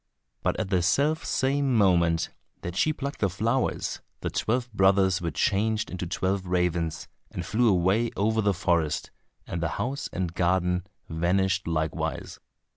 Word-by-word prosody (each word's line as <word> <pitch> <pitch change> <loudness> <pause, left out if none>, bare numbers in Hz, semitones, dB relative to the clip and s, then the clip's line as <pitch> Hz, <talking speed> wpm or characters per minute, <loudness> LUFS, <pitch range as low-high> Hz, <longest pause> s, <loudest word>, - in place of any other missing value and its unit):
But - - 0
at 95 - -3
the 90 -2 +3
self 145 - +2
same 135 -1 +1
moment 85 -5 +3 0.3
that 85 0 -5
she 155 - +3
plucked 140 -1 -5
the 100 - +2
flowers 115 +8 -1 0.2
the - - -2
twelve 120 +1 -1
brothers 95 -1 +3
were 85 - -1
changed 105 +7 0
into 90 -1 -4
twelve 95 +2 -1
ravens, 90 -2 0 0.2
and 90 - -5
flew 115 +6 +2
away 95 +5 +2
over 110 +2 +2
the 100 -2 +2
forest, 85 -4 0 0.3
and 85 - -4
the 85 - +1
house 135 +3 -3
and 90 -2 -3
garden 90 +1 +1 0.2
vanished 95 +3 +1
likewise. 80 -2 -2
95 Hz, 150 wpm, -27 LUFS, 85-110 Hz, 0.3 s, the